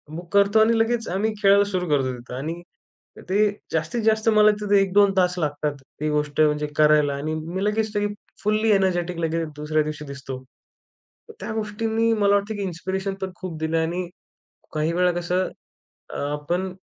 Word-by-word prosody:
Book 175 +2 -9
करतो 200 +2 +4
आणि 225 +1 +4
लगेच 230 0 +1
आम्ही 205 +4 0
खेळायला 200 0 +6
सुरू 180 -2 -1
करतो 135 -3 +2
तिथं. 125 +1 -11
आणि 160 +6 -4 0.7
ते 205 +2 +3 0.2
जास्तीत-जास्त 220 +7 +1
मला 215 -1 +6
तिथं 205 -1 +1
1-2 195 0 +4
तास 180 -1 +2
लागतात 145 -1 -1 0.3
ती 155 - 0
गोष्ट 150 -1 -1
म्हणजे 150 -1 +2
करायला. 150 -1 +4
आणि 150 +3 -3
मी 170 +5 -4
लगेच 215 +1 0 0.5
फुल्ली 215 +1 +2
एनर्जेटिक 180 -3 +1
लगेच 165 0 -1
दुसऱ्या 150 +1 0
दिवशी 150 0 -6
दिसतो. 135 -2 -7 1.0
त्या - - -4
गोष्टींनी 220 +1 0
मला 205 -2 +3
वाटतं 205 +2 -1
की 205 - -4
इन्स्पिरेशन 190 +2 -3
पण 190 0 -3
खूप 180 -4 -6
दिलं. 160 +1 0
आणि 175 +2 -2 0.6
काही 155 +2 0
वेळा 180 +1 +3
कसं? 180 +2 0 0.6
अ, - - -6 0.2
आपण 175 +6 -2
180 Hz, 160 wpm, -23 LUFS, 155-205 Hz, 1.0 s, खेळायला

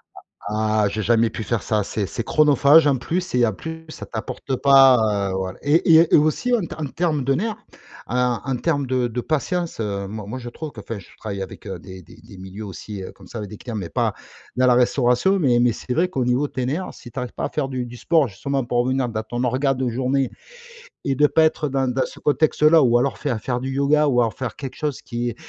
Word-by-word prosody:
Ah - - -12 0.3
ah 110 -1 +1
j'ai 110 - -3
jamais 115 +1 +3
pu 110 - -6
faire 115 -1 -1
ça. 105 -2 0
C'est 100 0 -3
c'est 115 - -4
chronophage 150 +2 +5
en 140 - +3
plus 170 +9 -2
c'est 125 -9 +1
en 110 - 0
plus 160 +7 -8
ça - - -8
t'apporte 130 +3 -4
pas, 125 -8 +5
heu, - - -3
voilà 95 -1 -4
et 160 +3 +4 0.2
et - - +10
aussi 155 +12 +2
en 220 - 0
t 170 - -5
en 155 - -4
terme 155 0 -1
de 135 - +2
nerfs, 215 +7 -2 0.5
en 125 -1 0
en 135 -1 -1
termes 145 0 0
de 125 -1 +1
de 120 +1 -3
patience, 165 +3 -2
heu, 100 -2 -3
moi 105 +1 -7
moi 130 +4 -5
je 120 - -9
trouve 155 +4 -7
qu'enfin 105 -1 -7
je 95 - -15
travaille 100 -3 -5
avec, 95 - -8
heu, - - -5
des 95 -1 -11
des - - -16
des 110 -4 -14
milieux, 95 +3 -8
heu, - - -6
aussi 100 +1 -7
comme 95 -2 -16
ça 115 - -7
avec 105 - -6
des 105 - -9
clients, 120 +1 -7
mais 95 -6 -4
pas - - 0 0.4
dans 130 0 +3
la 125 - +5
restauration, 125 +8 +3
mais 125 -6 +3
mais 120 -1 +3
c'est 125 - -8
vrai 175 +6 +2
qu'au 135 -8 -2
niveau 125 +4 +1
de - - -23
tes 125 -1 -2
nerfs. 155 +8 -3
Si 120 - -13
tu - - -5
arrives 125 -1 -5
pas - - -3
à - - -3
faire 145 -3 -2
du 130 -2 -3
du 120 0 -10
sport 160 0 +2
justement 135 +7 -3
pour 120 0 -1
revenir 130 -1 0
dans 110 -1 -3
ton 120 +3 -4
organisation 130 +3 +1
de 130 -1 -2
journée 130 +2 0 0.7
et 135 - 0
de 150 +3 +4
pas 160 +2 +3
être 155 -1 +1
dans 135 -1 0
dans 130 - 0
ce - - -13
contexte-là 155 +1 +4
ou 120 -2 +4
alors 135 +3 -1
faire 125 -7 -2
faire 125 -1 -2
du 130 +1 -4
yoga 140 +3 +2
ou 125 -2 +3
alors 115 -2 +1
faire 130 - -5
quelque 135 -3 -7
chose 150 -4 -3
qui, 120 -1 -3
125 Hz, 250 wpm, -22 LUFS, 115-145 Hz, 0.7 s, et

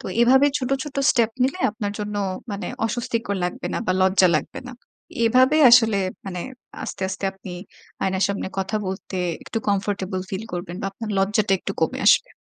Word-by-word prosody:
তো - - -8
এভাবে 265 +4 +6
ছোট, 260 -2 -3
ছোট 290 -1 -8
স্টেপ 235 -2 +2
নিলে 270 +8 0
আপনার 205 -1 -4
জন্য 210 0 -4 0.3
মানে 200 0 -4 0.2
অস্বস্তিকর 230 -3 -2
লাগবে 180 0 -4
না - - 0
বা, - - +2
লজ্জা 190 0 +5
লাগবে 150 - -5
না। - - -8 0.5
এভাবে 255 +5 +4
আসলে 225 -4 +6 0.3
মানে 180 -2 -4 0.4
আস্তে, 215 - -6
আস্তে 190 +1 -5
আপনি 190 -1 -10 0.5
আয়নার 190 0 +1
সামনে 200 -1 -3
কথা 195 +3 -1
বলতে 190 0 -5 0.3
একটু 225 - -3
কমফোর্টেবল 195 -2 -1
ফিল 195 +3 -4
করবেন 175 0 -5
বা, - - -2
আপনার 215 +1 -6
লজ্জাটা 200 +1 +2
একটু - - -4
কমে - - 0
আসবে। - - +5
205 Hz, 175 wpm, -23 LUFS, 190-235 Hz, 0.5 s, এভাবে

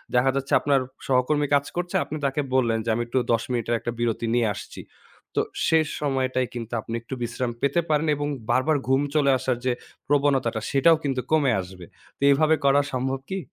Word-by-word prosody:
দেখা 125 +2 +4
যাচ্ছে 135 0 -2
আপনার 140 -2 +2 0.3
সহকর্মী 135 +3 +2
কাজ 140 0 +2
করছে, 175 0 -3
আপনি 150 +2 -5
তাকে 140 +2 0
বললেন 115 -3 +2
যে - - -1
আমি 120 - -1
একটু 120 +2 0
১০ 115 -1 +1
মিনিটের 120 -1 0
একটা 120 - -4
বিরতি 115 -1 -1
নিয়ে 120 -3 +2
আসছি। - - -9 0.5
তো - - +3 0.2
সে 160 - +4 0.2
সময়টায় 130 -3 0
কিন্তু 120 -1 -6
আপনি 115 - -7
একটু 115 - -9
বিশ্রাম 120 +1 -2
পেতে 140 +5 +2
পারেন। 155 +1 +2
এবং 145 0 -2 0.2
বারবার 150 +4 +2
ঘুম 135 +1 +3
চলে 140 -2 +4
আসার 130 -1 -1
যে 130 - +3 0.4
প্রবণতাটা, 135 -6 +1
সেটাও 160 +4 +5
কিন্তু 135 -3 -1
কমে 150 -4 +3
আসবে। 90 -1 -11 0.3
তো - - -43
এভাবে 155 +3 +4
করা 140 +1 +5
সম্ভব 130 +1 -1
কি? 195 - -2
135 Hz, 190 wpm, -24 LUFS, 120-145 Hz, 0.5 s, সেটাও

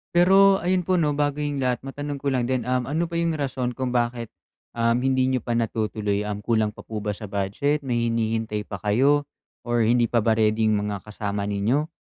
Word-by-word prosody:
Pero 195 +2 +6
ayun 180 -1 +1
po 185 - +3
’no, 155 -4 +2
bago 145 0 -1
’yong 145 -1 -2
lahat, 125 -2 -1
matanong 145 +2 -5
ko 140 -1 0
lang 125 -2 0
din, 130 -2 0
um, 125 0 -1
ano 160 +5 0
ba - - -4
’yong 170 -1 0
rason 130 -4 -2
kung 130 -2 -2
bakit, 120 -1 -1 0.4
uhm, 115 0 +2
hindi 130 -1 +2
niyo 130 -3 0
pa 120 - -4
natutuloy? 110 -3 -1
Um, 105 -1 -4
kulang 110 0 +1
pa - - -18
po 105 -2 -6
ba 105 - -1
sa 105 +1 -7
budget, 105 +10 -1
may 120 -3 0
hinihintay 110 -2 -1
pa 100 -2 -7
kayo 135 +9 +2 0.4
or 120 -1 +2
hindi 120 +1 +3
pa 115 -2 +1
ba 115 - +3
ready 110 0 +2
'yong 110 -1 +3
mga 100 -2 -4
kasama 105 -1 -4
ninyo? 105 +9 0
120 Hz, 215 wpm, -24 LUFS, 110-140 Hz, 0.4 s, Pero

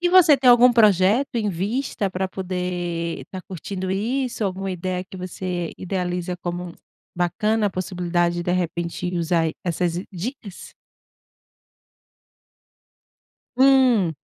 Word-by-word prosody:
E 350 - +2
você 350 -5 +7
tem 260 -1 +3
algum 245 +1 +7
projeto 215 +4 +4
em 215 -3 0
vista 200 +2 -2
para 190 +1 -2
poder 180 -3 -3
estar 185 -1 -9
curtindo 185 +1 -5
isso? 235 +4 -1
Alguma 195 0 -2
ideia 180 0 -3
que 190 - -11
você 180 -1 -4
idealiza 180 -1 -3
como 175 0 -5 0.4
bacana 210 +5 +1
a 200 - 0
possibilidade, 175 -1 -1
de 175 - -1
repente 175 0 -2
usar 165 -1 +1
essas 175 0 -1
dicas? 200 +1 -7 2.8
Hum. 255 - +4
185 Hz, 115 wpm, -23 LUFS, 175-215 Hz, 2.8 s, você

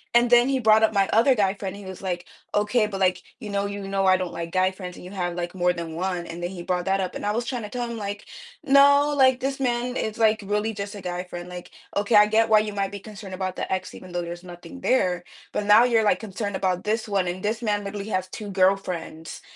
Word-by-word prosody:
And 240 0 +5
then 240 0 +6
he 270 -1 +1
brought 220 -1 +5
up 220 - +3
my 195 -1 +2
other 235 +5 +5
guy 200 -4 +1
friend, 195 -1 -5
he 200 -1 -10
was 190 -1 -8
like, 180 -1 -3 0.3
"Okay. 210 +2 +2
But, 195 -2 -5
like, 185 -1 +1 0.2
you 215 -4 -7
know 200 0 -1
you 200 -1 -5
know 195 0 0
I 185 0 +5
don't 185 -2 -4
like 170 0 -5
guy 185 0 +3
friends, 180 -2 -8
and - - -12
you 180 - -9
have, 180 -3 -2
like, 175 +1 -4
more 180 0 +2
than 165 -2 -6
1." 180 -1 -2
And 170 +1 -7
then 175 - -2
he 180 - -7
brought 180 0 -1
that 195 0 +1
up, 185 - -4
and - - -5
I 205 - +1
was 235 +2 -1
trying 250 -4 -3
to 210 - -6
tell 245 0 -3
him, 235 - -5
like, 205 -1 -5 0.4
"No, 285 +1 +5
like, 260 -2 +4
this 270 +1 -2
man 245 0 -1
is, 220 +1 -3
like, 220 -1 +3
really 210 +2 0
just 200 0 -5
a 200 - -8
guy 180 0 -4
friend. 175 0 -8
Like, 180 0 -9 0.3
okay, 205 +3 0
I 210 0 +8
get 225 +1 +3
why 215 -1 +7
you 210 -1 -2
might 195 -1 -1
be 200 - -6
concerned 200 -2 -10
about 185 0 -3
the - - -4
ex 185 0 -4
even 185 - -11
though 175 0 -2
there's 175 +1 -7
nothing 180 +10 -11
there, 180 -8 +1 0.3
but 210 - -2
now 210 +3 +7
you're 235 -3 +3
like 205 -3 +3
concerned 205 -1 -4
about 185 -1 -1
this 220 +1 -1
one 195 -3 0
and 180 +1 -4
this 220 +2 -1
man 205 -1 0
literally 200 +1 -5
has 185 -2 -1
2 205 0 -7
girlfriends. 185 -4 -1
200 Hz, 270 wpm, -24 LUFS, 185-220 Hz, 0.4 s, I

